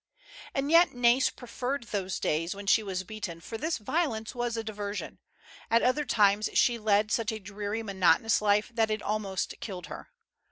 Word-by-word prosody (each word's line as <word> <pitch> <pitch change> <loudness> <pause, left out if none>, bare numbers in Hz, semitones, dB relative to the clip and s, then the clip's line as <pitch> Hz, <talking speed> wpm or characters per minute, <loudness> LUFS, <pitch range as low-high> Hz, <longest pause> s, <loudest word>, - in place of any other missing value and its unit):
And 280 +2 -1
yet 340 +1 +6
Nais 245 +2 +4
preferred 250 +2 -4
those 190 -2 -2
days 165 +4 -1
when 200 0 -8
she 210 +3 +4
was 190 -3 -3
beaten, 195 -4 -6
for 195 +7 -8
this 310 +7 -1
violence 225 -2 -2
was 240 -2 -2
a 225 - -2
diversion. 205 -1 -5 0.5
At 230 +1 +3
other 270 +4 +2
times 210 -3 +3
she 235 -1 +3
led 210 0 +2
such 230 -2 +1
a 220 - -4
dreary, 205 +2 -5
monotonous 200 +1 +3
life 210 +3 +2
that 225 -1 +1
it 215 -1 -2
almost 200 -3 -2
killed 185 -5 -6
her. - - -9
215 Hz, 175 wpm, -29 LUFS, 200-235 Hz, 0.5 s, yet